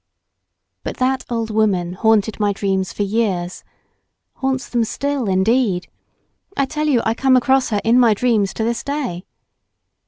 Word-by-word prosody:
But -, -, -5 dB
that 260 Hz, +1 st, 0 dB
old 230 Hz, -2 st, -2 dB
woman 195 Hz, -5 st, +1 dB
haunted 220 Hz, +2 st, +1 dB
my 205 Hz, -1 st, +1 dB
dreams 190 Hz, -1 st, -1 dB
for 205 Hz, -, -2 dB
years——haunts 215 Hz, +6 st, -4 dB
them 240 Hz, -2 st, 0 dB
still 275 Hz, 0 st, -2 dB
indeed. 190 Hz, 0 st, +1 dB, 0.7 s
I 275 Hz, -, +2 dB
tell 305 Hz, +3 st, -2 dB
you 255 Hz, -6 st, +2 dB
I 225 Hz, -, +2 dB
come 260 Hz, +2 st, +3 dB
across 265 Hz, +1 st, +2 dB
her 210 Hz, -2 st, 0 dB
in 230 Hz, +2 st, +4 dB
my 230 Hz, -4 st, +5 dB
dreams 215 Hz, -4 st, +1 dB
to 220 Hz, -, -2 dB
this 235 Hz, +1 st, -1 dB
day. 270 Hz, -12 st, -3 dB
225 Hz, 150 wpm, -19 LUFS, 200-255 Hz, 0.7 s, my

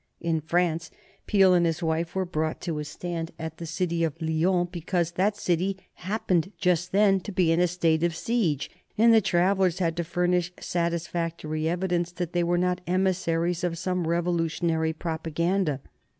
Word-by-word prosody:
In 165 Hz, -2 st, 0 dB
France, 165 Hz, 0 st, 0 dB, 0.4 s
Peel 195 Hz, -3 st, +5 dB
and 175 Hz, -1 st, +4 dB
his 165 Hz, 0 st, 0 dB
wife 165 Hz, +2 st, -1 dB
were 190 Hz, -1 st, 0 dB
brought 160 Hz, -2 st, -2 dB
to 165 Hz, -4 st, -3 dB
a -, -, -2 dB
stand 165 Hz, +2 st, -5 dB
at 160 Hz, 0 st, -6 dB
the 170 Hz, -, -5 dB
city 170 Hz, 0 st, -1 dB
of 165 Hz, 0 st, -2 dB
Lyons 175 Hz, +2 st, +1 dB
because 170 Hz, 0 st, -1 dB
that 200 Hz, +4 st, +1 dB
city 185 Hz, +1 st, 0 dB, 0.2 s
happened 185 Hz, -2 st, -1 dB
just 180 Hz, -1 st, +1 dB
then 195 Hz, -1 st, +4 dB
to 195 Hz, -, -7 dB
be 180 Hz, -3 st, +2 dB
in 165 Hz, -, +3 dB
a 180 Hz, -, +4 dB
state 165 Hz, -2 st, +1 dB
of 170 Hz, -1 st, +1 dB
siege, 175 Hz, -, 0 dB, 0.3 s
and 230 Hz, +2 st, +6 dB
the 225 Hz, -, +6 dB
travellers 185 Hz, -1 st, +2 dB
had 165 Hz, -3 st, 0 dB
to 170 Hz, -, 0 dB
furnish 175 Hz, +1 st, 0 dB
satisfactory 170 Hz, -2 st, -2 dB
evidence 175 Hz, -1 st, -1 dB
that 175 Hz, -1 st, -4 dB
they 175 Hz, -1 st, +2 dB
were 175 Hz, +1 st, +1 dB
not 180 Hz, 0 st, 0 dB
emissaries 175 Hz, -2 st, 0 dB
of 170 Hz, -2 st, -1 dB
some 180 Hz, -1 st, -1 dB
revolutionary 165 Hz, -1 st, 0 dB
propaganda. 160 Hz, -1 st, -1 dB
175 Hz, 170 wpm, -26 LUFS, 165-180 Hz, 0.4 s, and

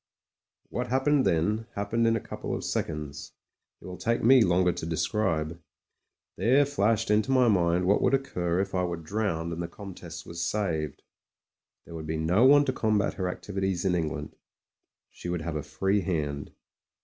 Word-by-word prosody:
What 125 Hz, 0 st, -3 dB
happened 135 Hz, +1 st, +2 dB
then, 105 Hz, +6 st, +1 dB
happened 115 Hz, +3 st, 0 dB
in 115 Hz, -, +3 dB
a -, -, 0 dB
couple -, -, -5 dB
of -, -, -5 dB
seconds; 75 Hz, -3 st, -4 dB, 0.5 s
it -, -, -15 dB
will 90 Hz, -1 st, -8 dB
take 115 Hz, +1 st, 0 dB
me 130 Hz, +2 st, +7 dB
longer 90 Hz, -1 st, +3 dB
to 85 Hz, -1 st, -5 dB
describe. 85 Hz, -2 st, -1 dB, 0.8 s
There 135 Hz, +5 st, +4 dB
flashed 115 Hz, -7 st, +1 dB
into 105 Hz, +3 st, +2 dB
my 130 Hz, -2 st, +4 dB
mind 90 Hz, -4 st, +2 dB
what 100 Hz, +3 st, +3 dB
would -, -, +4 dB
occur 90 Hz, -10 st, -1 dB
if 95 Hz, 0 st, -4 dB
I 90 Hz, -1 st, +1 dB
were 85 Hz, -1 st, -2 dB
drpwned 85 Hz, -1 st, -2 dB
and 85 Hz, -, -4 dB
the 85 Hz, -, -3 dB
Comtesse 85 Hz, -3 st, -9 dB
was 85 Hz, 0 st, -5 dB
saved. 85 Hz, -8 st, -2 dB, 0.8 s
There -, -, -11 dB
would 80 Hz, -1 st, -6 dB
be 80 Hz, +1 st, -2 dB
no 90 Hz, +9 st, +3 dB
one 145 Hz, +2 st, +7 dB
to 130 Hz, -, 0 dB
combat 110 Hz, -4 st, +1 dB
her 95 Hz, -2 st, -2 dB
activities 95 Hz, -1 st, -3 dB
in 95 Hz, -, +2 dB
England; 80 Hz, -3 st, -3 dB, 0.8 s
she 90 Hz, -, -7 dB
would 90 Hz, -2 st, -2 dB
have 80 Hz, -1 st, -4 dB
a 75 Hz, -, -1 dB
free 95 Hz, +6 st, 0 dB
hand. 75 Hz, -6 st, -3 dB
95 Hz, 175 wpm, -28 LUFS, 85-110 Hz, 0.8 s, me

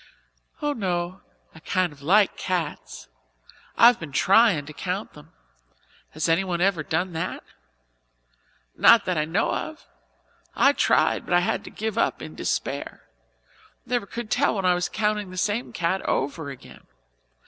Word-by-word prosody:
"Oh, 295 Hz, 0 st, +1 dB
no; 180 Hz, -5 st, -3 dB, 0.3 s
I 160 Hz, -, -13 dB
kind 180 Hz, 0 st, -1 dB
of 145 Hz, -, -18 dB
like 195 Hz, +7 st, +3 dB
cats. 175 Hz, -5 st, -4 dB, 0.7 s
I've 235 Hz, 0 st, +7 dB
been 155 Hz, -4 st, -8 dB
tryin' 195 Hz, -, +4 dB
to 150 Hz, -, -10 dB
count 185 Hz, +6 st, -4 dB
them. 150 Hz, -, -16 dB, 0.8 s
Has 155 Hz, +2 st, -1 dB
anyone 175 Hz, +1 st, +1 dB
ever 185 Hz, -3 st, +2 dB
done 170 Hz, +4 st, -2 dB
that?" 160 Hz, -, -4 dB, 1.3 s
"Not 230 Hz, -3 st, +6 dB
that 180 Hz, -, 0 dB
I 150 Hz, -, 0 dB
know 170 Hz, +8 st, 0 dB
of. 315 Hz, -, -5 dB, 0.7 s
I 275 Hz, -, +5 dB
tried -, -, +2 dB
but 175 Hz, -, 0 dB
I 175 Hz, -, +5 dB
had 220 Hz, +5 st, -1 dB
to -, -, -8 dB
give 220 Hz, 0 st, -3 dB
up -, -, +1 dB
in -, -, -8 dB
despair -, -, -3 dB, 0.8 s
never 240 Hz, -5 st, -2 dB
could 235 Hz, 0 st, -7 dB
tell 275 Hz, -2 st, +2 dB
when 195 Hz, -2 st, -2 dB
I 180 Hz, -, +5 dB
was 180 Hz, 0 st, -1 dB
counting 210 Hz, -2 st, -1 dB
the 185 Hz, -, -10 dB
same 210 Hz, +6 st, -1 dB
cat 180 Hz, +2 st, -1 dB
over 145 Hz, +2 st, -2 dB
again. 135 Hz, -2 st, -13 dB
185 Hz, 155 wpm, -24 LUFS, 165-215 Hz, 1.3 s, I've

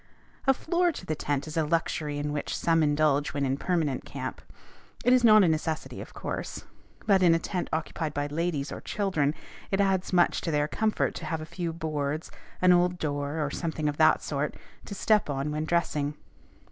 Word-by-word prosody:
A 270 Hz, -, +7 dB
floor 345 Hz, +4 st, +1 dB
to 235 Hz, -, -9 dB
the 155 Hz, -, -1 dB
tent 145 Hz, -2 st, -2 dB
is 155 Hz, -, -7 dB
a 160 Hz, -, +2 dB
luxury 150 Hz, -2 st, -1 dB
in 145 Hz, 0 st, -2 dB
which 145 Hz, -, -3 dB
some 165 Hz, -1 st, +2 dB
indulge 145 Hz, -1 st, +2 dB
when 140 Hz, -1 st, +1 dB
in 135 Hz, 0 st, +1 dB
permanent 155 Hz, -4 st, -1 dB
camp. -, -, -6 dB, 0.6 s
It 250 Hz, -, +6 dB
is 255 Hz, -1 st, +4 dB
not 215 Hz, -3 st, +8 dB
a -, -, +4 dB
necessity, 160 Hz, 0 st, -2 dB
of -, -, -11 dB
course; -, -, -5 dB, 0.4 s
but, 195 Hz, -3 st, +4 dB
in 170 Hz, -2 st, +6 dB
a -, -, +4 dB
tent 180 Hz, +2 st, -3 dB
occupied 160 Hz, 0 st, -2 dB
by 145 Hz, 0 st, -2 dB
ladies 150 Hz, -1 st, -2 dB
or -, -, -6 dB
children, 165 Hz, -8 st, 0 dB, 0.3 s
it 195 Hz, -, 0 dB
adds 190 Hz, -2 st, +1 dB
much 175 Hz, -2 st, +3 dB
to -, -, -3 dB
their 150 Hz, -1 st, +1 dB
comfort 215 Hz, +7 st, 0 dB
to -, -, -7 dB
have 160 Hz, -2 st, -2 dB
a 155 Hz, -, -6 dB
few 170 Hz, 0 st, -4 dB
boards, 155 Hz, -2 st, -3 dB, 0.3 s
an 180 Hz, 0 st, +7 dB
old 180 Hz, 0 st, +3 dB
door, 145 Hz, 0 st, -2 dB
or 140 Hz, -, -3 dB
something 160 Hz, -2 st, -2 dB
of 145 Hz, 0 st, -1 dB
that 155 Hz, 0 st, +4 dB
sort, 145 Hz, 0 st, -2 dB, 0.3 s
to 200 Hz, -, -7 dB
step 210 Hz, -3 st, +2 dB
on 140 Hz, +1 st, -2 dB
when 155 Hz, +1 st, -2 dB
dressing. 150 Hz, -3 st, 0 dB
160 Hz, 200 wpm, -28 LUFS, 145-180 Hz, 0.6 s, not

